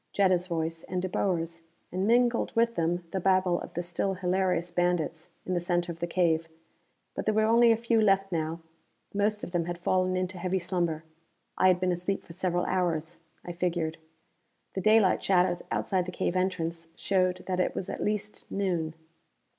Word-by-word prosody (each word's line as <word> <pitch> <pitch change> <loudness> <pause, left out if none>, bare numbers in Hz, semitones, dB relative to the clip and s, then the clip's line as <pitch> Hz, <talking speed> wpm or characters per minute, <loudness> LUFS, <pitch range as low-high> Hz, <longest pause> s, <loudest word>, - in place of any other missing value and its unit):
Jetta's 185 -2 +3
voice, 165 -1 -2
and 185 - -2
De 185 - -1
Boer's, 170 -3 -1 0.3
and, 185 +3 -1
mingled 240 +1 +2
with 230 0 +3
them, 170 -1 0
the 190 - -1
babble 185 -1 +2
of 175 - -9
the 175 - -1
still 175 +3 -1
hilarious 180 -2 0
bandits 175 -2 0 0.2
in 185 - -2
the 175 - +1
center 175 0 0
of 165 - -9
the 170 - -2
cave. 165 -2 +1 0.7
But - - -4
there 215 - +1
were 220 - +4
only 230 +1 +6
a 225 - +3
few 230 -1 +2
left 195 -2 +3
now; 165 0 -2 0.5
most 210 +1 +1
of - - -5
them 175 -2 0
had 175 0 -4
fallen 185 +1 +1
into 185 0 -3
heavy 185 +1 0
slumber. 175 -3 -1 0.5
I - - +4
had 180 -1 +4
been 185 0 +1
asleep 180 +3 -2
for 165 - -11
several 175 0 0
hours, 170 -2 -1 0.3
I 175 - -4
figured. 170 -2 -2 0.7
The 190 - -2
daylight 215 -2 +4
shadows 180 -2 +3
outside 185 -2 0
the - - -4
cave 180 - -1
entrance 170 -3 -1
showed 185 -2 0
that 185 -1 -1
it 180 - 0
was 185 - -3
at - - -4
least 210 0 -3
noon. 175 -5 -1
180 Hz, 185 wpm, -28 LUFS, 170-190 Hz, 0.7 s, only